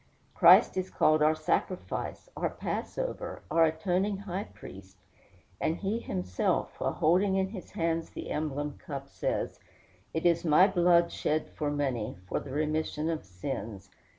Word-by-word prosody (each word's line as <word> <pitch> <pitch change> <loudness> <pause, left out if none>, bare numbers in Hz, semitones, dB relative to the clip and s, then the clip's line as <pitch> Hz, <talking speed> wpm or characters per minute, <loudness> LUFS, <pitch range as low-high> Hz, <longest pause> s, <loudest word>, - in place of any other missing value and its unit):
Christ - - +7
is 185 0 -1
called 155 0 +3
our 155 +1 +4
sacrifice, 180 - -2
our - - -1
passover, - - -4
our 165 0 +5
atoning 180 +5 0
high 195 0 -4
priest; 95 - -12 0.6
and 160 - 0
he 205 +4 -1
himself, 90 - -1
while - - 0
holding 185 +5 +3
in 190 0 +1
his 195 -3 -9
hands 165 -1 -1
the - - -7
emblem 150 -1 -3
cup, 140 -2 -6
says, - - -3 0.5
"It 160 - -3
is 170 -1 +3
my 165 +3 +6
blood 175 -3 +4
shed 155 +1 -1
for 150 -2 -2
many, 135 -9 -2
for - - -1
the - - -9
remission 155 +2 -1
of 160 - -3
sins." 100 -1 -6
160 Hz, 150 wpm, -30 LUFS, 145-180 Hz, 0.6 s, Christ